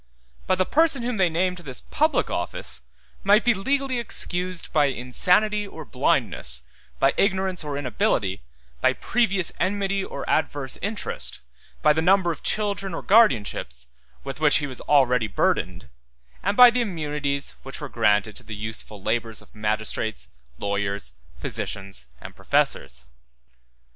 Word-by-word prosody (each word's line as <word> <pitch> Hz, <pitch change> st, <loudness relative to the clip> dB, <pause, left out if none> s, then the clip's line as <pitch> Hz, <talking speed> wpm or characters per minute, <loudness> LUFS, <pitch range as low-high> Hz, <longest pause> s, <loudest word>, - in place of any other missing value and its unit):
But 185 Hz, -, +2 dB
the 185 Hz, -, +2 dB
person 310 Hz, -, +2 dB
whom 245 Hz, -1 st, -2 dB
they 185 Hz, -3 st, +3 dB
named 180 Hz, +3 st, 0 dB
to 175 Hz, -, -10 dB
this 135 Hz, -4 st, -5 dB
public 310 Hz, -1 st, +2 dB
office 85 Hz, -7 st, -3 dB, 0.4 s
might 205 Hz, +4 st, +5 dB
be 240 Hz, -, +5 dB
legally 265 Hz, +5 st, 0 dB
excused 180 Hz, -5 st, -3 dB
by 150 Hz, -2 st, +4 dB
insanity 180 Hz, -, +1 dB
or 160 Hz, -5 st, -9 dB
blindness, 60 Hz, -, 0 dB, 0.4 s
by 135 Hz, 0 st, +4 dB
ignorance 190 Hz, -3 st, +1 dB
or 145 Hz, -2 st, -4 dB
inability, 125 Hz, -, 0 dB, 0.4 s
by -, -, +4 dB
previous 200 Hz, -7 st, +1 dB
enmity 195 Hz, +2 st, 0 dB
or -, -, -6 dB
adverse 145 Hz, -4 st, -1 dB
interest, 205 Hz, +2 st, -1 dB, 0.4 s
by 150 Hz, -, +6 dB
the 160 Hz, -, 0 dB
number 185 Hz, 0 st, +4 dB
of 160 Hz, -, -7 dB
children 200 Hz, -4 st, -1 dB
or -, -, -5 dB
guardianships 105 Hz, -, +2 dB, 0.3 s
with -, -, -6 dB
which -, -, +4 dB
he 150 Hz, -, -1 dB
was 130 Hz, -3 st, -6 dB
already 125 Hz, -5 st, +3 dB
burdened, 65 Hz, -10 st, 0 dB, 0.5 s
and 200 Hz, +2 st, -1 dB
by 250 Hz, -1 st, +10 dB
the 250 Hz, +1 st, 0 dB
immunities 150 Hz, -8 st, -2 dB
which -, -, -8 dB
were -, -, -5 dB
granted 105 Hz, +1 st, +2 dB
to -, -, -10 dB
the 110 Hz, -, -7 dB
useful 105 Hz, -1 st, -6 dB
labors 115 Hz, 0 st, -1 dB
of -, -, -15 dB
magistrates, 110 Hz, 0 st, -2 dB, 0.3 s
lawyers, 100 Hz, -8 st, -2 dB, 0.2 s
physicians, 95 Hz, -6 st, -4 dB
and -, -, -10 dB
professors. 65 Hz, +3 st, 0 dB
160 Hz, 145 wpm, -24 LUFS, -, 0.5 s, by